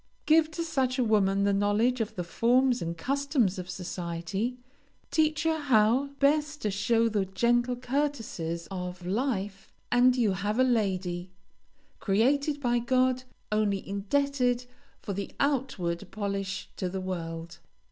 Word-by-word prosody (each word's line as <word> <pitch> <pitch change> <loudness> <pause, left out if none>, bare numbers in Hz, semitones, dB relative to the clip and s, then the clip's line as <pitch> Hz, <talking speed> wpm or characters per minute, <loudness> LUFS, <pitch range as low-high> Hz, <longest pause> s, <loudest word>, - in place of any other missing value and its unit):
Give 315 0 +5
to 335 +1 -4
such 265 -6 0
a 255 - +2
woman 200 -3 +2
the 200 0 +3
knowledge 210 +5 +2
of 220 0 -3
the 180 - -2
forms 245 +7 +2
and 170 0 -3
customs 260 - 0
of 180 0 -7
society, 180 +5 -3 0.5
teach 310 0 +2
her 320 -1 +1
how 250 -1 +3
best 300 +1 +2
to 210 - 0
show 225 +4 +2
the 210 -3 +1
gentle 240 +6 +1
courtesies 240 - -2
of 180 -1 -5
life, 200 -2 -2 0.2
and 245 +1 +5
you 230 -5 +2
have 205 +3 -2
a 255 - +5
lady, 190 -7 0 0.7
created 280 +9 +2
by 240 -3 +1
God, 255 +1 +1 0.3
only 210 -2 0
indebted 250 +4 0 0.4
for 200 - -3
the 200 +1 -5
outward 220 -11 -1
polish 200 -2 -4
to 185 - -2
the 190 +1 -4
world. 170 -2 -5
220 Hz, 140 wpm, -28 LUFS, 195-260 Hz, 0.7 s, Give